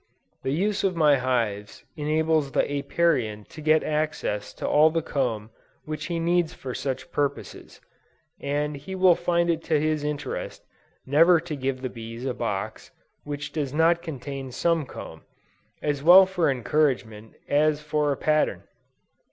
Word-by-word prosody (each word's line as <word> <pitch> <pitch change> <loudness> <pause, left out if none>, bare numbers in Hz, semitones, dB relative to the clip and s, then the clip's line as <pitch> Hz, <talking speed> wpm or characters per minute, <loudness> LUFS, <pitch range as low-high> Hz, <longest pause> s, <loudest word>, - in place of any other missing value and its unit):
The - - -3
use 200 +7 0
of 190 -2 +1
my 150 -3 +4
hives 115 -6 -2
enables 155 -1 0
the - - +3
Apiarian 140 -6 0
to 155 - -10
get 155 +1 +3
access 150 -9 -2
to - - -4
all 155 +2 +5
the 165 0 -1
comb 115 -7 -2 0.3
which 155 0 -5
he 170 -1 -2
needs 170 0 +1
for 130 -2 -6
such 135 +6 -4
purposes, 145 -1 -4 0.6
and 145 +1 -2
he 145 +7 -7
will 185 -1 +6
find 170 0 0
it 165 -1 -2
to 155 -2 +2
his 155 0 0
interest, 150 -1 -4 0.4
never 165 +5 +5
to 165 -2 -5
give 130 -1 -3
the - - 0
bees 115 +1 -8
a 130 - -1
box 105 -5 -4 0.4
which 145 -1 -5
does 145 -3 -3
not 165 +2 +3
contain 135 -4 -6
some 165 +2 0
comb, - - -9 0.6
as 145 -2 -1
well 180 +5 +9
for 180 -4 0
encouragement 125 -4 -1
as 150 +1 +2
for 150 -1 0
a 140 - -2
pattern. 155 0 +1
150 Hz, 155 wpm, -25 LUFS, 130-160 Hz, 0.6 s, well